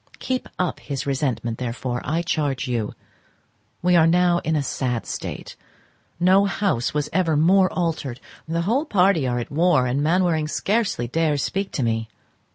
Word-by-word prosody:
Keep 255 -1 -3
up 180 -2 -1
his 140 -3 -5
resentment, 125 -5 -2
therefore, 120 0 -3
I 160 +5 -1
charge 145 -6 -1
you. 115 -4 -2 0.9
We 180 0 +4
are 165 -1 +6
now 175 +1 +3
in 160 -1 -1
a 145 - +1
sad 125 -3 -2
state; - - -6 0.6
no 190 +3 +5
house 195 - 0
was 150 -1 -1
ever 165 -4 +2
more 185 +4 +4
altered; 160 -8 -2 0.3
the 165 +1 -1
whole 245 - +1
party 185 - +3
are 120 -1 -1
at 120 - -4
war, 155 -3 +3
and 125 +3 0
Mainwaring 165 -1 +2
scarcely 195 - 0
dares 150 +1 0
speak 195 0 -2
to 135 - -1
me. 115 -1 -1
155 Hz, 165 wpm, -23 LUFS, 130-180 Hz, 0.9 s, are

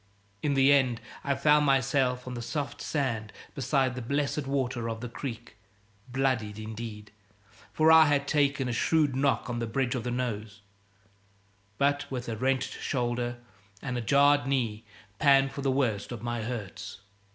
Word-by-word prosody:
In 145 -2 0
the 135 +1 +6
end, 130 -4 +2 0.2
I 140 -1 0
found 150 +1 +4
myself 130 -2 +1
on 125 -2 -5
soft 145 +4 -4
sand 115 -8 -2 0.2
beside 135 -1 +1
the 125 - -5
blessed 140 +3 -1
water 130 -4 -1
of 115 0 -4
the 125 - -5
creek, 115 -2 -7 0.5
bloodied 125 -5 0
indeed 110 -1 -7 0.6
for 160 +1 +4
I 160 -1 +8
had 140 -1 +1
taken 140 -3 +1
a 120 - -1
shrewd 150 +2 +2
knock 135 0 +1
on 120 -1 -3
the 115 - -2
bridge 125 +2 0
of 125 -4 -3
the 125 - -3
nose 110 -4 -4 1.2
but 145 +3 +1
with 125 -2 -4
a 115 - -3
wrenched 130 +3 -1
shoulder 120 -1 -1 0.4
and 125 +1 -4
a 120 - -1
jarred 140 +2 +4
knee 115 -6 -1 0.3
pan 135 -2 +5
for 140 - -6
the 135 - 0
worst 120 -7 0
of 120 - -6
my 120 -1 -2
hurts. 110 -4 -6
130 Hz, 165 wpm, -28 LUFS, 115-140 Hz, 1.2 s, I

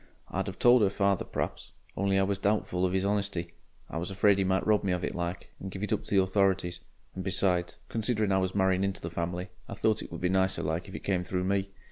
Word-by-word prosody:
I'd - - -2
'ave - - -8
told 120 0 +6
'er 100 - +4
father 100 -1 +1
p'r'aps, - - -4 0.2
only 100 0 +1
I 95 - +4
was 100 0 -1
doubtful 100 -3 +1
of 90 - -2
'is 95 0 +1
honesty 100 -4 -1 0.3
I - - -5
was 85 - -3
afraid 100 +1 +3
he - - +3
might 95 0 +1
rob 105 -1 +3
me 95 -2 +1
of 90 0 -2
it - - -2
like, 85 +1 -4
and 95 - -6
give 95 +2 -6
it 105 - 0
up 105 - -2
to - - -11
the 95 - +6
authorities 95 -2 +1 0.3
and 95 - -5
besides, 90 -2 0
considering 110 -2 0
I 95 - +4
was 95 0 -1
marrying 95 -1 +3
into 100 -1 -1
the 85 - -5
family, 90 +2 -3 0.2
I - - -5
thought 110 -1 +1
it - - -9
would - - -5
be 90 - +2
nicer 95 +1 +2
like 80 +3 -2
if - - -9
it - - -7
came 95 -3 0
through 90 0 -2
me. 100 +1 0
95 Hz, 255 wpm, -29 LUFS, 90-100 Hz, 0.3 s, told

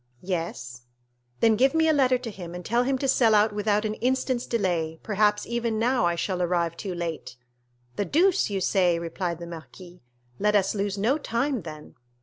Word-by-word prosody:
"Yes." 165 -9 -5 0.5
"Then 225 -1 +5
give 265 +7 +3
me 320 0 +3
a 315 - +4
letter 260 -3 +3
to 245 -2 -7
him, 175 -3 -8
and 180 - -8
tell 235 +2 +2
him 265 +1 0
to 270 - -2
sell 235 -4 +4
out 210 +1 +3
without 210 +1 0
an 215 - -1
instant's 255 +1 -1
delay, 170 -8 -1
perhaps 210 0 +1
even 235 -2 -2
now 235 -4 +2
I 170 - 0
shall 180 +1 -2
arrive 170 -1 0
too 185 0 -5
late." 165 -7 -5 0.6
"The 205 - 0
deuce 345 - +2
you 195 -2 -2
say!" 180 -2 +2
replied 170 +1 -3
the 170 - -8
marquis, 175 +2 -11 0.4
"let 210 0 +2
us 195 -1 +2
lose 200 -1 -2
no 240 +9 +1
time, 255 -1 -1
then!" 155 -2 -10
205 Hz, 190 wpm, -26 LUFS, 175-235 Hz, 0.6 s, Then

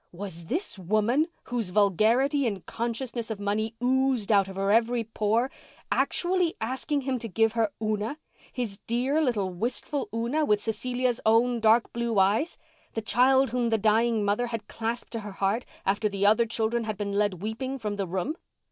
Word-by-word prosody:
Was 175 -2 -7
this 325 - -2
woman, 215 - +2 0.2
whose 235 -6 -3
vulgarity 225 - +3
and 200 -5 -4
consciousness 235 0 -3
of 220 -2 -4
money 215 +2 -1
oozed 260 -4 +2
out 200 -2 +4
of 190 - -8
her 195 +1 0
at 220 - +7
every 235 0 0
pore, 225 +3 0 0.4
actually 360 -1 +1
asking 265 +5 -2
him 260 -1 -2
to 230 - -5
give 225 +2 +2
her 225 -2 0
Una—his 215 0 -4
dear 255 +6 +1
little 215 -10 0
wistful 245 - -2
Una 235 +7 0
with 210 -8 +3
Cecilia's 245 +3 -1
own 230 +2 +3
dark 225 +1 +3
blue 235 -2 -1
eyes—the 220 - -1
child 260 +2 +4
whom 245 -1 0
the 225 - +2
dying 220 +1 +2
mother 210 +4 +1
had 230 -2 -5
clasped 230 +1 -4
to 230 - -2
her 205 -2 -8
heart 200 +5 -1 0.2
after 205 +2 +1
the 200 0 -1
other 220 +3 +4
children 230 +1 0
had 215 -2 -3
been 200 -1 -3
led 200 -3 0
weeping 255 +5 -3
from 210 -4 -4
the 195 -2 -2
room. 190 - -2
225 Hz, 175 wpm, -27 LUFS, 205-245 Hz, 0.4 s, at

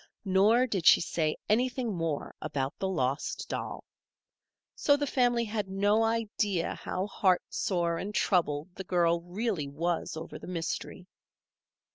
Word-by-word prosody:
Nor 205 +6 +4
did 195 -9 -1
she - - +9
say 155 -2 -1
anything 245 +1 +1
more 165 -4 -3
about 140 -3 -2
the 190 - 0
lost 140 -5 -1
doll. - - -4 0.9
So 285 -1 +3
the 290 - -1
family 245 -3 +2
had 210 -2 -3
no 205 +3 +2
idea 215 -5 0
how 185 +1 -3
heartsore 180 -3 0
and 205 - -4
troubled 175 -5 +1
the 190 - -7
girl 170 -2 +2
really 180 -3 -2
was 165 +3 -2
over 160 - -7
the - - -10
mystery. 170 -2 -4
190 Hz, 135 wpm, -29 LUFS, 165-220 Hz, 0.9 s, she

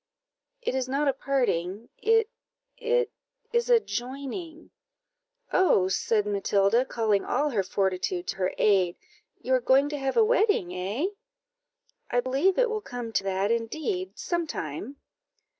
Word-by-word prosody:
"It - - -1
is 260 -1 -1
not 285 +2 +1
a 275 - +3
parting; 235 -7 -1
it 450 +1 +3 0.5
it 475 -1 0 0.4
is 475 +1 +1
a 475 -1 +7
joining." 280 - -6 0.8
"Oh," 195 - +4
said 210 +2 +1
Matilda, 205 +3 +2
calling 220 -5 +1
all 290 +3 0
her 215 -5 +1
fortitude 195 - -1
to - - -3
her 185 -1 0
aid, 190 -4 +3 0.5
"you 260 - 0
are 255 - +3
going 270 +3 +4
to 295 -1 -4
have 270 0 -1
a 450 - +6
wedding, 420 - +2
eh?" 195 - -2 1.0
"I 245 - +2
believe 275 +10 +1
it - - +4
will 430 -1 -2
come 245 - -6
to 195 - +1
that, 195 +2 0
indeed, 315 - -2
some 345 -2 -2
time." 200 - -5
260 Hz, 145 wpm, -27 LUFS, -, 1.0 s, a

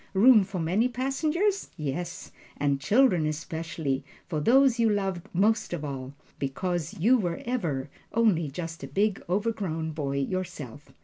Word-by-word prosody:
Room 220 +1 +7
for 190 0 -6
many 185 +9 +2
passengers? 310 - 0
Yes, 170 +5 -4 0.3
and 140 -1 0
children 200 - +4
especially, 160 -2 -3 0.2
for 160 -4 -2
these 250 - +4
you 230 -1 +4
loved 195 -4 -1
most 215 +3 +2
of 155 -3 -3
all, 135 -1 -6 0.2
because 175 +6 -2
you 230 +7 +4
were 175 -4 -2
ever 170 - -1 0.2
only 200 -10 +2
just 165 +1 -6
a - - -4
big 200 +8 0
overgrown 185 -6 -1
boy 140 -3 -2
yourself. 145 -4 -4
175 Hz, 140 wpm, -27 LUFS, 150-220 Hz, 0.3 s, Room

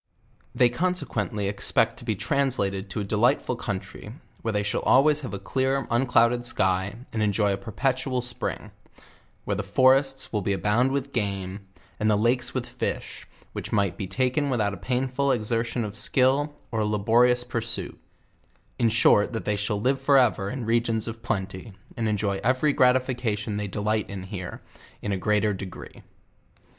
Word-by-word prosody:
They 125 - +5
consequently 125 - -1
expect 115 +3 +1
to - - -9
03 110 -3 0
translated 105 -6 0
to 110 - -3
a - - -2
delightful 120 +6 +1
country, 105 0 -6 0.3
where 115 - -1
they 105 -1 0
shall 100 - -1
always 150 +3 +4
have 130 - -6
a 100 - -4
clear, 130 +6 -1
unclouded 120 -1 +3
sky, 95 -4 +1 0.2
and 110 - -1
enjoy 105 -1 +2
a - - -2
perpetual 130 +5 -1
spring; 125 0 -4 0.7
where - - -1
the - - -1
forests 135 +6 +2
will 105 - +1
abound 105 +7 +2
with 140 0 -3
game, 100 -3 -3 0.3
and 110 - +2
the 105 - +4
lakes 120 +4 +2
with - - -3
fish, - - -5 0.3
which - - -5
mi^ht 100 -3 +1
be 95 - -5
taken 130 +6 0
without 110 -6 0
a - - -6
painful 130 +5 0
exertion 115 0 0
of 105 0 -7
skill, 135 +6 +2 0.2
or 115 - -1
a 105 - +1
laborious 120 +4 +3
pur 120 -1 -3
suit; 115 +1 -4 0.8
in 115 - +3
short 110 0 +4
that 115 - -4
they 105 - +1
shall 105 +1 -2
live 130 +4 +1
forever 130 -8 +3
in 125 +1 -4
regions 115 -1 +1
of 115 0 -6
plenty, 95 +1 -4 0.2
and 115 -2 -1
enjoy 100 -2 0
every 130 +5 +2
gratification 125 -5 +1
they 105 0 -2
delight 105 +2 -1
in 100 -2 -6
here, 95 -1 -7 0.4
in 105 - -2
a 95 - 0
grea 105 +2 +1
ter 105 -1 +1
degree. 95 -1 -9
115 Hz, 170 wpm, -25 LUFS, 105-130 Hz, 0.8 s, They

